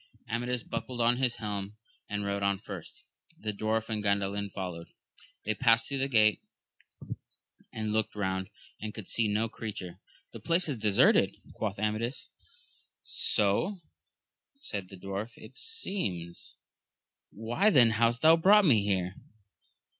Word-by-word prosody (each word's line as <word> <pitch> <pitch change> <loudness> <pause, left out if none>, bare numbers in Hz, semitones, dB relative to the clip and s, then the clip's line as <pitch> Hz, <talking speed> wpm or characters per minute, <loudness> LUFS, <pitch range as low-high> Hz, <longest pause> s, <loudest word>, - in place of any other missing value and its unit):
Amadis 120 +1 -1
buckled 125 -1 -5
on 120 +1 +3
his 125 -2 +1
helm 105 -1 -5 0.3
and 105 -1 -2
rode 100 0 -1
on 100 0 +2
first, 95 -4 -9 0.3
the 105 -1 -3
dwarf 110 +2 -1
and 110 -2 -2
Gandalin 100 0 0
followed; 90 -3 -5 0.6
they 110 - +1
passed 115 0 +3
through 140 -1 -3
the 135 - +1
gate, 110 -5 +4 1.3
and 110 -1 -3
looked 110 -1 0
round, 95 -1 -2 0.3
and 105 0 -6
could 110 -4 -8
see 115 -2 +2
no 105 +2 +1
creature. 95 -5 -7 0.3
The - - -7
place 170 +1 +1
is 140 -5 -1
deserted, 105 -2 +4 0.2
quoth 105 -2 -3
Amadis. 110 +4 -2 0.7
So, 105 - +1 0.8
said 100 - -5
the 95 - -11
dwarf, 100 +5 -5
it 110 +4 -13
seems. 100 - -3 0.4
— - - -58
^Why 120 - +2
then 120 - +6
hast 115 +3 +2
thou 160 +1 +8
brought 200 +4 +6
me 115 - +5
here 95 -2 0
110 Hz, 140 wpm, -30 LUFS, 100-120 Hz, 1.3 s, thou